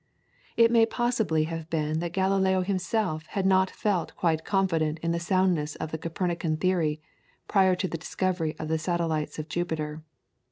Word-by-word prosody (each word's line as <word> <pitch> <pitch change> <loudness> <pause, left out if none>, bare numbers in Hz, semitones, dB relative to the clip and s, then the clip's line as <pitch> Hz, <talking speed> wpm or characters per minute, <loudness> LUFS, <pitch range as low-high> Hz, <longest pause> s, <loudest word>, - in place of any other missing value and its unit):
It 230 0 +6
may 230 -1 +5
possibly 225 -11 +1
have 165 0 -5
been 155 -1 0
that 170 0 -3
Galileo 190 0 +2
himself 185 -3 -1
had 195 - +1
not 190 0 +4
felt 195 -5 -1
quite 160 -2 0
confident 165 -6 +1
in 165 - +1
the 170 - 0
soundness 175 -4 +1
of 160 0 -5
the 160 - -3
Copernican 165 -1 -2
theory, 160 -4 +1 0.5
prior 190 -2 +4
to 185 +1 -1
the 165 - -5
discovery 175 -2 -1
of 155 - -5
the 160 0 0
satellites 165 -2 -1
of 155 0 -5
Jupiter. 160 -2 -3
170 Hz, 165 wpm, -27 LUFS, 160-190 Hz, 0.5 s, It